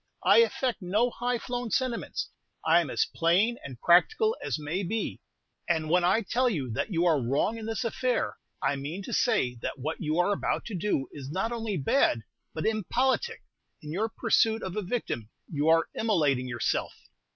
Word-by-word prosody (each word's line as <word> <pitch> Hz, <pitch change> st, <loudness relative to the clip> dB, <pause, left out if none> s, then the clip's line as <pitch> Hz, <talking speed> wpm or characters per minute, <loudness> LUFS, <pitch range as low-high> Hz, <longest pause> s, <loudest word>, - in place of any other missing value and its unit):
I -, -, +6 dB
affect 260 Hz, -, +1 dB
no 210 Hz, +7 st, +1 dB
high 245 Hz, +1 st, -1 dB
flown 245 Hz, 0 st, -4 dB
sentiments. 250 Hz, 0 st, -2 dB, 0.3 s
I 165 Hz, +2 st, +5 dB
am 160 Hz, -, -4 dB
as -, -, +1 dB
plain 190 Hz, +8 st, +2 dB
and 130 Hz, -4 st, -8 dB
practical 435 Hz, -, +4 dB
as -, -, -1 dB
may 155 Hz, +5 st, -3 dB
be; 215 Hz, +4 st, -3 dB, 0.5 s
and 160 Hz, -2 st, +1 dB
when 180 Hz, 0 st, +4 dB
I 195 Hz, +6 st, +3 dB
tell 250 Hz, +5 st, +1 dB
you 140 Hz, -, -2 dB
that 110 Hz, -, -2 dB
you 170 Hz, -1 st, +1 dB
are 160 Hz, -5 st, +3 dB
wrong 140 Hz, -, +1 dB
in 220 Hz, -, -6 dB
this 225 Hz, +3 st, -2 dB
affair, 245 Hz, +2 st, -1 dB, 0.3 s
I 140 Hz, -, +1 dB
mean 155 Hz, +8 st, -5 dB
to -, -, -6 dB
say 215 Hz, -, +2 dB
that -, -, -4 dB
what 150 Hz, +5 st, -4 dB
you 155 Hz, +1 st, -1 dB
are 180 Hz, +3 st, +3 dB
about -, -, -1 dB
to 220 Hz, -, -5 dB
do 170 Hz, -7 st, 0 dB
is 135 Hz, -2 st, -8 dB
not 190 Hz, +9 st, -1 dB
only 225 Hz, -4 st, -2 dB
bad, 135 Hz, -, +2 dB, 0.3 s
but 160 Hz, -, -4 dB
impolitic. 255 Hz, -, 0 dB, 0.4 s
In 150 Hz, -, -6 dB
your 210 Hz, +7 st, -1 dB
pursuit 225 Hz, 0 st, +2 dB
of 185 Hz, -, -4 dB
a 210 Hz, -, -1 dB
victim, 175 Hz, -, -3 dB, 0.2 s
you 150 Hz, -1 st, -1 dB
are 165 Hz, 0 st, +4 dB
immolating 150 Hz, -, +1 dB
yourself." 120 Hz, -2 st, -1 dB
190 Hz, 185 wpm, -28 LUFS, 155-230 Hz, 0.5 s, I